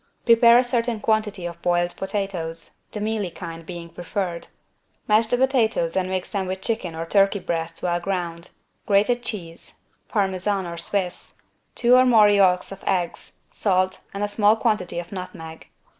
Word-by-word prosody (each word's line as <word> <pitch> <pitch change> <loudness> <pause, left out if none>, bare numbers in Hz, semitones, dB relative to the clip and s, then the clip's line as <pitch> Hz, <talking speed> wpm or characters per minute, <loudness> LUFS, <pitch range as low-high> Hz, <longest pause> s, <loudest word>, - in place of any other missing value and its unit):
Prepare 235 0 +7
a 250 - +5
certain 240 -2 -1
quantity 210 -4 0
of 170 0 -7
boiled 175 0 +1
potatoes, 190 -5 -4 0.2
the 210 - -5
mealy 210 -2 -1
kind 165 -1 -8
being 170 0 -8
preferred. 175 +1 -4 0.6
Mash 220 +1 +4
the 245 - +1
potatoes 235 -10 +1
and 185 -1 0
mix 185 -1 -3
them 195 -3 -2
with 190 +1 -4
chicken 215 -8 -2
or 165 +1 -4
turkey 195 +3 +3
breast 165 -3 -4
well 175 -1 0
ground, 175 -2 -4 0.4
grated 210 +4 +3
cheese 170 -8 -7 0.3
(Parmesan 195 -1 0
or 170 0 -6
Swiss), 180 +1 -3 0.4
two 245 0 +3
or 255 - +7
more 220 -4 +6
yolks 190 -3 +3
of 195 - -9
eggs, 175 -3 -2 0.2
salt 185 -2 0
and 200 +1 -4
a - - +1
small 205 +1 +3
quantity 210 -7 -1
of 175 0 -5
nutmeg. 165 -4 -8
190 Hz, 160 wpm, -23 LUFS, 175-215 Hz, 0.6 s, Prepare